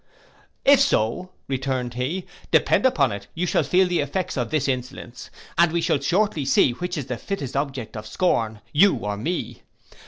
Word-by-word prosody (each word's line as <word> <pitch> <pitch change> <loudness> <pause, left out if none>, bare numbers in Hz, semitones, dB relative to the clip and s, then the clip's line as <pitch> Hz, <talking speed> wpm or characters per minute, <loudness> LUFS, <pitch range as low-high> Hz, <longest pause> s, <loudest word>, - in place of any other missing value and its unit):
'If 280 -1 +7
so,' 180 - +1 0.2
returned 130 -2 -2
he, 140 +10 -3 0.2
'depend - - +4
upon 140 - +2
it 100 0 -7
you 175 +2 -1
shall 175 - +2
feel 180 +6 +3
the 180 -1 0
effects 180 +6 -2
of 120 -3 -2
this 155 -4 0
insolence, 125 -1 -5 0.3
and 170 -1 +5
we 170 - 0
shall 155 - +1
shortly 170 +2 +1
see 135 -1 +4
which 175 +8 -4
is 145 - -3
the 125 -2 -4
fittest 145 -11 -5
object 135 -5 -3
of 105 0 -7
scorn, 110 - 0
you 185 +6 +5
or 105 0 -3
me. 165 - -4
140 Hz, 180 wpm, -23 LUFS, 125-180 Hz, 0.3 s, If